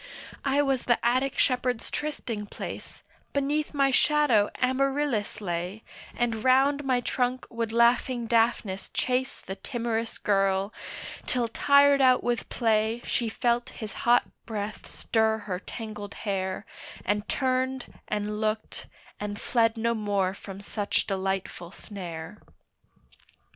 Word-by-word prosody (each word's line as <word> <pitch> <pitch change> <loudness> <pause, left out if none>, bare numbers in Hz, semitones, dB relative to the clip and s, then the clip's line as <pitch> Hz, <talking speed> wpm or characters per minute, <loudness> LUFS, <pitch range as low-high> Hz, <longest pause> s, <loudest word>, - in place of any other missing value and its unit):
I 280 +1 +3
was 270 -3 0
the 240 - +4
Attic 255 +3 +2
shepherd's 250 -2 +1
trysting 235 -8 -3
place, - - -7 0.3
Beneath 290 +2 0
my 275 -2 +3
shadow 265 -7 +4
Amaryllis 260 -4 0
lay, 180 +3 -3 0.3
And 230 -2 -1
round 275 +3 +4
my 255 -2 +2
trunk 250 +1 -1
would 230 -1 -2
laughing 235 +1 +3
Daphnis 225 -4 +1
chase 255 +1 -1
The 190 - -6
timorous 230 +1 -2
girl, 195 0 +1 0.5
till 245 -2 +1
tired 280 +3 +5
out 255 -1 +5
with 240 -1 -1
play 225 0 +1
She 235 -2 0
felt 240 +1 0
his 215 -2 -7
hot 240 +1 +4 0.2
breath 210 -1 -4
stir 220 -1 +1
her 180 -3 -2
tangled 210 -1 -7
hair, 190 -2 -2 0.4
And 205 +1 0
turned, 260 -1 0
and 210 0 -2
looked, 215 0 -2 0.3
and 205 0 -4
fled 225 -1 +2
no 230 +1 +1
more 200 -4 0
from 195 0 -9
such 205 0 -1
delightful 190 -3 -2
snare. 180 -2 -8
230 Hz, 125 wpm, -27 LUFS, 205-255 Hz, 0.5 s, tired